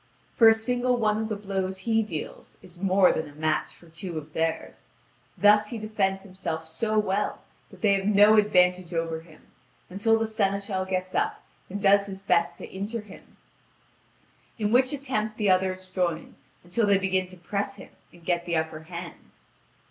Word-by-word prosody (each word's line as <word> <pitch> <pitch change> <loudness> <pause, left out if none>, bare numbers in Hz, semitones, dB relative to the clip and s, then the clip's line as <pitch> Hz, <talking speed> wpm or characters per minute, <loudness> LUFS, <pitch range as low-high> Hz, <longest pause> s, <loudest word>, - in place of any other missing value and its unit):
For 230 - +6
a 225 - +9
single 245 +2 0
one 215 -2 +1
of 220 - -3
the 215 - -1
blows 190 -2 -3
he 225 -1 +3
deals 170 -8 -7
is 180 -1 -14
more 195 -1 +5
than 160 -1 -3
a 145 - -16
match 155 0 -1
for 170 - -18
two 165 +1 -6
of 155 0 -8
theirs; 160 0 -3 0.5
thus 210 0 +5
he 235 - -4
defends 200 -3 -1
himself 180 -4 -5
so 215 +7 -1
well 210 -1 0 0.3
that - - -16
they 205 -2 +5
have 195 0 0
no 210 +1 +6
advantage 180 -4 +3
over 165 -1 -1
him, 160 -1 -18 0.5
until 225 +4 +2
the 225 - 0
seneschal 200 -3 -1
gets 185 0 -3
up - - -1 0.3
and 200 +2 -5
does 200 0 +5
his 190 -1 -7
best 175 -3 +1
to - - -8
injure 205 +4 -4
him, 210 -2 -16 1.2
in 210 -2 -1
which 255 +2 +4
attempt 245 -7 -3
the 205 -3 +2
others 185 0 0
join, 175 -3 -2 0.3
until 190 +5 0
they 200 -1 +5
begin 190 -1 0
to 185 0 -13
press 200 +3 -3
him 195 - -13 0.2
and 175 -1 -18
get 175 0 0
the 170 - 0
upper 160 -1 -2
hand. 170 0 -10
195 Hz, 180 wpm, -26 LUFS, 175-210 Hz, 1.2 s, a